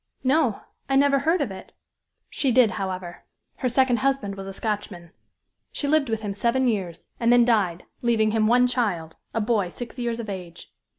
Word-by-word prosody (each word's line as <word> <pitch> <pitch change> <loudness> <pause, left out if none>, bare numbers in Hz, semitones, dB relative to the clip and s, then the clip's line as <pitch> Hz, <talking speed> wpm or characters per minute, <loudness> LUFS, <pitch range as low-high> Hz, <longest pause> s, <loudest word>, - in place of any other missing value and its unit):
"No 265 -4 +2 0.3
I 270 - +2
never 275 0 +4
heard 325 +6 +1
of - - -1
it." - - -10 0.5
"She 270 - 0
did, 240 -3 +5
however 185 -3 -5 0.4
her 255 - -1
second 255 0 +3
husband 265 -6 0
was 195 0 -8
a - - -5
Scotchman. 200 -5 -4 0.6
She 285 - -3
lived 290 -3 +2
with 225 -1 -1
him 205 -2 -3
seven 235 +5 +1
years, 190 -7 -3
and 235 0 +3
then 240 -1 +6
died, 195 -7 +1 0.2
leaving 225 -3 +2
him 215 -1 +2
one 245 +2 +5
child, 200 -11 -1 0.2
a 225 - +1
boy 210 -4 +1
six 245 +6 -8
years 235 -1 -2
of 230 - -5
age. 180 -4 -8
230 Hz, 185 wpm, -24 LUFS, 195-255 Hz, 0.6 s, then